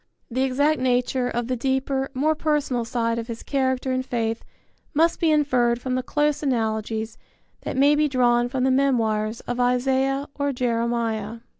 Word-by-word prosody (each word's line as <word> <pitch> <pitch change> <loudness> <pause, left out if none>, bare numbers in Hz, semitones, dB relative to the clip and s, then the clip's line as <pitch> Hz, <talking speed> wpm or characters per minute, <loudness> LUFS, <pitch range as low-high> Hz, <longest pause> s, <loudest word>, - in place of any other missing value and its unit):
The 255 +3 -1
exact 285 +4 +2
nature 250 0 +1
of 240 0 -2
the 255 +2 -1
deeper, 265 +2 -1
more 300 +4 +2
personal 295 -6 -1
side 230 0 -1
of 230 - -6
his 230 -1 -7
character 260 -1 0
and 255 0 0
faith 230 -3 -2 0.5
must 330 +3 +3
be 330 - +2
inferred 255 -6 +2
from 255 +1 -3
the 255 - 0
close 295 +2 0
analogies 220 -4 -2 0.4
that - - -5
may 285 +2 +5
be 300 0 +2
drawn 245 -3 +2
from 260 0 -1
the 265 - +3
memoirs 230 -5 +1
of 245 0 -4
Isaiah 265 +3 +1
or 285 0 -1
Jeremiah. 230 -2 -1
255 Hz, 165 wpm, -24 LUFS, 235-270 Hz, 0.5 s, may